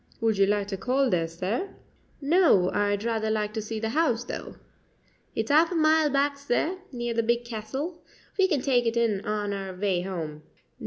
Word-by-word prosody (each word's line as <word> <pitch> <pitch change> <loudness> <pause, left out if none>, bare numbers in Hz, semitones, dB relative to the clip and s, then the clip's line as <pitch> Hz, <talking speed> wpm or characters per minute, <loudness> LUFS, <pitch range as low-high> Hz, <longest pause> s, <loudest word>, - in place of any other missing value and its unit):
"Would 225 -3 +1
you 195 - +5
like 205 -1 +1
to 195 - -3
call 260 +6 +1
there, 165 -2 +1
sir?" 190 - -3 0.5
"No; 290 - +4
I'd 205 0 0
rather 225 -2 -1
like 215 -1 -1
to 220 - -2
see 220 +1 -4
the 225 0 -2
house, 245 -4 +1
though." - - -7 0.8
"It's - - -1
a - - +3
'alf 325 +3 +5
a - - -2
mile 315 -1 +4
back, 280 0 +1
sir, 315 +7 -1
near 240 -2 -3
the 230 - +2
big 235 +1 0
Castle. 265 +10 -5 0.3
We 385 -2 +4
can 305 -8 0
take 245 -3 +2
it 230 +1 0
in 220 -4 +1
on 210 -1 -1
our 195 -2 -5
way 185 -2 0
'ome." 155 -5 -5
230 Hz, 200 wpm, -27 LUFS, 205-280 Hz, 0.8 s, you